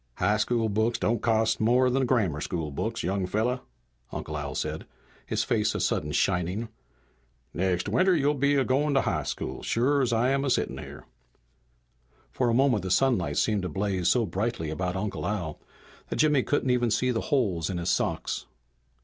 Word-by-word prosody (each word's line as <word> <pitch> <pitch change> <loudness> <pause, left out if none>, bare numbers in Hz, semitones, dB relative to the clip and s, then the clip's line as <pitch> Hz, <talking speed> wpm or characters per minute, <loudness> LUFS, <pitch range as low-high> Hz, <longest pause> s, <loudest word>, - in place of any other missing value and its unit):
"High 105 +1 +2
school 115 +1 +1
books 110 +3 +1
don't 115 0 0
cost 110 -1 +1
no - - +2
more 125 +2 +4
than 130 0 +1
grammar 100 - +1
school 80 -3 -3
books, 70 - -3
young 95 +1 -1
fella," 120 +6 0 0.5
Uncle 75 - -5
Al 75 -2 -4
said, - - -3 0.4
his - - 0
face - - 0
a - - -1
sudden 75 0 0
shining. 90 +7 0 0.8
"Next 90 0 0
winter 185 0 +3
you'll 145 -1 +2
be 140 0 +2
a 135 -2 +2
goin' 140 +2 +1
to 135 - +5
high - - -1
school, - - -5
sure 140 +5 +1
as 130 -2 +1
I'm 130 +4 +2
a 140 - 0
sittin' - - 0
here!" - - -10 1.3
For 125 -2 0
a - - +2
moment 130 -5 +3
the 95 - -4
sunlight 130 +5 +2
seemed 105 -3 +2
to 90 - -3
blaze 95 +1 -1
so 120 -3 +3
brightly 95 -3 -2
about 90 +3 -2
Uncle 100 +2 -3
Al 85 -7 -3 0.5
that - - -2
Jimmy 150 -3 +3
couldn't 130 -1 0
even 120 -1 +2
see 125 +3 +1
the 115 - -1
holes 105 - 0
in 95 - -2
his 85 0 0
socks. - - -1
110 Hz, 185 wpm, -27 LUFS, 95-130 Hz, 1.3 s, to